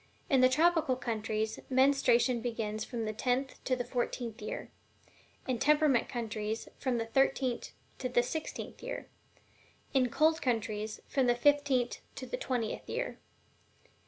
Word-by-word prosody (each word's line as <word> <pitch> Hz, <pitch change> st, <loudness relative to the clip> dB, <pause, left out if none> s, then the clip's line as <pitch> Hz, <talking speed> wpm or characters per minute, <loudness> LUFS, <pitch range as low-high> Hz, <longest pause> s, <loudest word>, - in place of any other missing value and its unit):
In 265 Hz, -2 st, +5 dB
the 255 Hz, -, +7 dB
tropical 320 Hz, -1 st, +3 dB
countries, 220 Hz, -3 st, -2 dB
menstruation 260 Hz, -2 st, +4 dB
begins 220 Hz, -3 st, -2 dB
from 230 Hz, -1 st, -4 dB
the 215 Hz, -, -2 dB
tenth 255 Hz, +4 st, -1 dB
to 255 Hz, -, +2 dB
the 250 Hz, -, -2 dB
fourteenth 240 Hz, -2 st, -3 dB
year; 210 Hz, -, -5 dB, 0.8 s
in 250 Hz, -3 st, 0 dB
temperate 295 Hz, -4 st, +4 dB
countries, 220 Hz, -2 st, -3 dB
from 255 Hz, -3 st, 0 dB
the 225 Hz, -, -1 dB
thirteenth 260 Hz, +1 st, +1 dB, 0.3 s
to 255 Hz, -, -2 dB
the 240 Hz, -1 st, +3 dB
sixteenth; 315 Hz, -, -5 dB, 1.1 s
in 255 Hz, -2 st, +3 dB
cold 315 Hz, +5 st, +3 dB
countries, 220 Hz, -3 st, -1 dB
from 265 Hz, -3 st, +1 dB
the 240 Hz, -, +4 dB
fifteenth 275 Hz, -2 st, +2 dB, 0.2 s
to -, -, -6 dB
the -, -, -3 dB
twentieth 245 Hz, -, -2 dB
year. -, -, -3 dB
245 Hz, 135 wpm, -32 LUFS, 225-270 Hz, 1.1 s, the